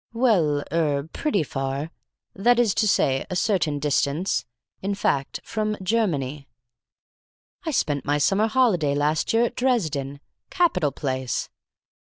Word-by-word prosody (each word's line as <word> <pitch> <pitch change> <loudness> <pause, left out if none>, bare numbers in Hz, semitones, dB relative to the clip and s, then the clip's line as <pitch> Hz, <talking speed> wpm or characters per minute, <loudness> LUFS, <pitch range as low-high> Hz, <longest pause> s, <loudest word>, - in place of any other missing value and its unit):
"Well 180 - +2
er 150 -3 0
pretty 250 - 0
far. 135 +2 -3 0.4
That 235 +5 +3
is 235 -5 +3
to 215 - +1
say, 135 -8 +2
a 185 - -3
certain 175 -7 +1
distance. 145 +3 0 0.4
In 200 +1 -1
fact, 140 -8 -1
from 215 -1 -2
Germany." 155 - -1 1.2
"I - - +2
spent 145 - 0
my 145 +1 +1
summer 195 +9 +2
holiday 210 - +2
last 150 +2 +1
year 225 +1 +3
at 240 - -4
Dresden. 155 - -1 0.3
Capital 180 - +2
place!" 130 -2 -3
160 Hz, 130 wpm, -24 LUFS, 140-215 Hz, 1.2 s, That